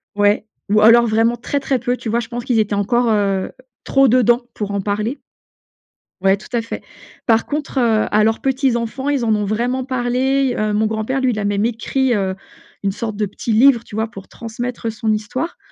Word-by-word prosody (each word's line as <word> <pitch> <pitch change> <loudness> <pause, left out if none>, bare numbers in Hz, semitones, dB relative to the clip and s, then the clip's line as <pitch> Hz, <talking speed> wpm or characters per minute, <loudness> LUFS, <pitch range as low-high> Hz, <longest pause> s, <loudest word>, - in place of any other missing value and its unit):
Ouais 205 +1 +2 0.2
ou 210 +1 +4
alors 235 +2 +7
vraiment 225 +2 +2
très, 280 +4 -2
très 270 -1 0
peu, 245 +1 -1
tu - - -8
vois? 230 +2 +1
Je 225 - -9
pense 240 0 -5
qu'ils 245 - +1
étaient 210 -1 0
encore, 235 +4 +1
heu, 195 -2 0 0.3
trop 270 0 +3
dedans 240 0 +4
pour 205 -1 -4
en 200 - -1
parler. 210 +7 -2 1.0
Ouais 195 +1 +3
tout - - -13
à 235 - +1
fait. 230 - -6 0.4
Par 225 -1 +3
contre, 295 -2 -3
heu, 225 -3 +2
à 210 0 +4
leurs 225 +1 +2
petits 265 -2 +1
enfants, 235 +4 -3
ils 275 -5 0
en 220 -1 +3
ont 210 - -1
vraiment 240 +5 -1
parlé. 255 +1 0
Heu, 215 0 0
mon 215 +1 +2
grand-père, 220 +5 -1
lui 255 -1 +2
il 215 - -3
a 205 - -2
même 205 +1 +1
écrit, 245 +3 0
heu, 190 -3 -1 0.5
une 200 - +1
sorte 215 +1 -4
de 215 - 0
petit 205 +3 -5
livre, 235 +1 +5
tu 210 - -11
vois? 220 +1 0
Pour 195 -4 -11
transmettre 235 0 -5
son 220 0 -1
histoire. 245 +10 -3
230 Hz, 215 wpm, -19 LUFS, 215-250 Hz, 1.0 s, alors